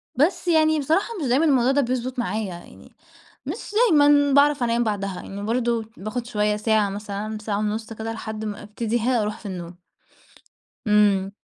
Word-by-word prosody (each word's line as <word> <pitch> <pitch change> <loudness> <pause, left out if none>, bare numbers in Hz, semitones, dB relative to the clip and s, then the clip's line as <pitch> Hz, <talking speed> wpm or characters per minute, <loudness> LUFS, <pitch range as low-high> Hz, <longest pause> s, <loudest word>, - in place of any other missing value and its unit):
بس 350 +7 +1
يعني 315 -2 +4
بصراحة 320 - +1
مش 280 - -1
دايمًا 265 +7 +3
الموضوع 265 -4 +3
ده 285 +1 +3
بيضبُط 255 0 -2
معايا، 215 -1 -1
يعني 175 - -14 0.5
مش - - -6 0.2
دايمًا 290 -2 +5
باعرف 285 -1 +4
أنام 235 0 +1
بعدها. 200 -3 -2
يعني 200 +1 -7
برضه 235 0 0
باخُد 225 +4 -5
شوية 210 -2 0
ساعة 210 -2 +1
مثلًا، 210 +1 -5
ساعة 205 -1 -2
ونُص 215 +2 -3
كده 225 +1 -5
لحد 220 -1 -6
ما 210 -1 -5
أبتدي 220 +3 -2
ها 240 0 +1
أروح 210 +1 -3
في - - -11
النوم. 175 -2 -7 1.1
إمم. 200 -2 +3
225 Hz, 170 wpm, -23 LUFS, 210-260 Hz, 1.1 s, دايمًا